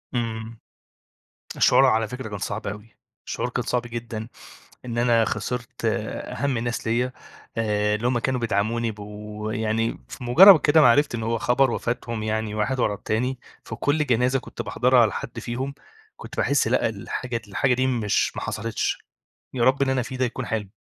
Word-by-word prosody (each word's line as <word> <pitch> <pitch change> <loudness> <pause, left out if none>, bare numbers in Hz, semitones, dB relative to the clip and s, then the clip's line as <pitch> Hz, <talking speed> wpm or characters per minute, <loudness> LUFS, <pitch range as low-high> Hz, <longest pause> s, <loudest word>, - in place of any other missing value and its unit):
إمم، 115 -1 -3 1.0
الشعور - - +5
على 110 0 +3
فكرة 125 -1 -6
كان 100 - -5
صعب 100 +2 -4
أوي، 105 +2 -8 0.3
الشعور 125 - -2
كان 125 0 -2
صعب 125 -1 0
جدًا، 115 -2 -6 0.6
إن 120 -1 -4
أنا 120 -2 +3
خسرت 125 -1 -4
أهم 140 -4 -2
الناس 115 -1 -3
ليا، 125 +3 0 0.4
آآ، 105 -1 +1
اللي 120 +3 -1
هم 125 -1 +1
كانوا 130 +1 -1
بيدعموني 115 +1 0
بو 105 +1 -7
يعني 110 +1 -1
في 125 - -9
مُجرّد 170 +8 +9
كده 155 +1 +5
ما 125 - +7
عرفت 145 -1 +2
إن 115 - -4
هو 115 +1 0
خبر 125 +2 +2
وفاتهم 115 -2 -3
يعني 110 -1 -2
واحد 125 +5 -1
ورا 105 - +2
التاني، 125 +6 -2 0.2
في - - -7
كل 150 +1 +1
جنازة 125 +1 +2
كنت - - -8
باحضرها 125 0 +3
على 110 -3 +4
حد 120 - -6
فيهم، 130 +4 -4 0.4
كنت - - -10
باحس 140 -4 +2
لأ، 120 -1 +2
الحاجة 115 +3 -4
د - - -8
الحاجة 125 +6 +1
دي 130 +1 +1
مش 115 -5 0
ما - - -4
حصلتش، 115 +1 -2 0.6
يا 125 -3 0
رب 135 +2 +3
اللي 135 -1 +2
أنا 130 - +1
فيه 130 +1 -6
ده 130 - +2
يكون 125 0 -4
حلم. 110 -3 -3
120 Hz, 180 wpm, -24 LUFS, 110-125 Hz, 1.0 s, مُجرّد